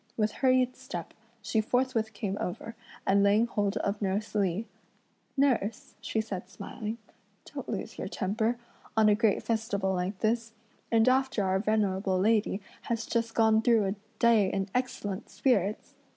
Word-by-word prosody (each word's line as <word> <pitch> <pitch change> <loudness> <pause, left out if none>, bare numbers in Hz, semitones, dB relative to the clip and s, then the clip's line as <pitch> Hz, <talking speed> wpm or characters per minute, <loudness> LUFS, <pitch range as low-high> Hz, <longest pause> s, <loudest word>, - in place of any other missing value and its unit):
With 215 -1 +2
hurried 255 0 +2
step, 215 -10 -7 0.3
she 220 +1 +1
forthwith 230 -1 0
came 200 -1 -3
over, 225 +5 -4 0.3
and 200 +1 +4
laying 205 +3 +4
hold 205 -3 -1
of 200 +1 -2
nurse 200 +2 -1
Li, 200 0 0 0.7
"Nurse," 240 -6 +1
she 220 +1 -1
said 190 -4 -4
smiling, 215 +4 -6 0.5
"don't - - -7
lose - - -4
your - - -3
temper, 220 +4 -1 0.4
on 215 -1 +6
a - - +6
great 215 -1 +2
festival 210 -4 0
like 185 +2 -2
this, 225 +2 0 0.4
and 225 0 +4
after 260 -4 +2
our 190 0 +1
venerable 195 -3 +1
lady 210 0 +2 0.3
has 230 -1 -1
just 230 -1 -1
gone 220 -1 +4
through 225 -3 +4
a 195 - -2 0.2
day 225 -5 +4
in 195 0 -2
excellent 230 -5 -2
spirits! 215 -6 0
215 Hz, 150 wpm, -29 LUFS, 200-230 Hz, 0.7 s, on